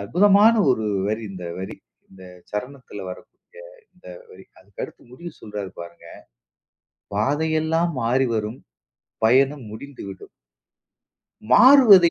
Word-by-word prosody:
அற்புதமான 200 - +4 0.2
ஒரு 110 -3 0 0.2
வரி, 110 +1 -2
இந்த 90 -2 -9
வரி. 95 - -7 0.3
இந்த 95 -1 -15 0.3
சரணத்துல 125 -2 -7
வரக்கூடிய - - -13 0.5
இந்த - - -22 0.2
வரி. 450 - -15
அதுக்கடுத்து - - -10
முடிவு 170 +6 -9
சொல்றாரு 105 -3 -7
பாருங்க, 85 0 -12 1.1
"பாதையெல்லாம் 160 +7 0
மாறி 125 +3 +1
வரும் 110 +3 -3 0.7
பயணம் 135 +3 +3
முடிந்துவிடும்." 110 -6 -10 1.2
மாறுவதை 210 - +7
130 Hz, 100 wpm, -22 LUFS, 105-170 Hz, 1.2 s, மாறுவதை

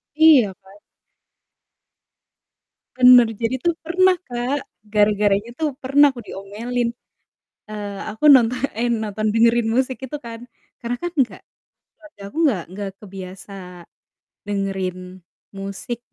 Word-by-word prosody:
Iya, 295 -11 +6
kan? 190 0 -20 2.2
Bener, 250 -2 +8
jadi 230 +4 -2
tuh 340 +4 0
pernah, 370 +3 +3
Kak, 250 +3 -2 0.2
gara-garanya 210 +1 +2
tuh 300 -4 -1
pernah 285 +2 +5
aku 240 - -8
diomelin, 235 +5 -4 0.8
eee, 205 -1 -6
aku 220 +8 +1
nonto 250 -4 +6 0.2
eh 235 +2 0
nonton, 215 -1 -1
dengerin 230 0 +3
musik 260 +2 0
itu 295 +3 -5
kan 230 0 -8 0.4
karena 240 +1 -2
kan 350 - -4
enggak 270 -5 0 0.6
keluarga 310 -9 -16
aku - - -17
nggak 210 - +1
nggak 200 +1 -5
kebiasa 195 0 -10 1.0
dengerin 195 -2 -2 0.6
musik 200 +5 -6
230 Hz, 115 wpm, -21 LUFS, 205-255 Hz, 2.2 s, Bener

